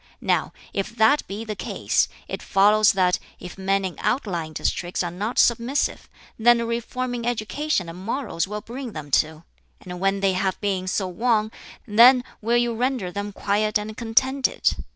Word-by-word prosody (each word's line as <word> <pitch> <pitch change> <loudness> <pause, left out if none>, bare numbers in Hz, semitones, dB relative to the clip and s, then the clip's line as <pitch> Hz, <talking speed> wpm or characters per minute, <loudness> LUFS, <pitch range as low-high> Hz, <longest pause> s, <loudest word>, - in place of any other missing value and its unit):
Now - - 0 0.2
if 200 +3 -3
that 240 +6 +3
be 210 +3 -6
the 215 -1 -4
case, - - 0 0.2
it - - -5
follows 210 +2 +4
that 180 -2 +2 0.2
if 180 - -9
men 195 0 0
in 185 - -5
outlying 175 - -1
districts 175 +4 -2
are 175 - -3
not 205 +7 -4
submissive, 240 +4 +1 0.3
then 240 +1 +5
a 235 - -1
reform 240 +2 -3
in 240 -1 -4
education 240 - -1
and 175 +3 -9
morals 225 -6 -2
will 210 +1 -5
bring 240 +1 -7
them 150 -2 -8
to; 155 +1 -11 0.4
and 180 -1 -8
when 195 +1 +1
they 195 -1 +2
have 190 0 -1
been 190 -3 -1
so 190 0 -1
won, 215 +3 +1 0.3
then 245 +4 +6 0.2
will 235 +2 +2
you 240 -1 +1
render 245 -5 -1
them 205 +2 -4
quiet 210 +2 0
and 210 +1 -6
contented. 260 +4 +1
210 Hz, 170 wpm, -23 LUFS, 190-235 Hz, 0.4 s, then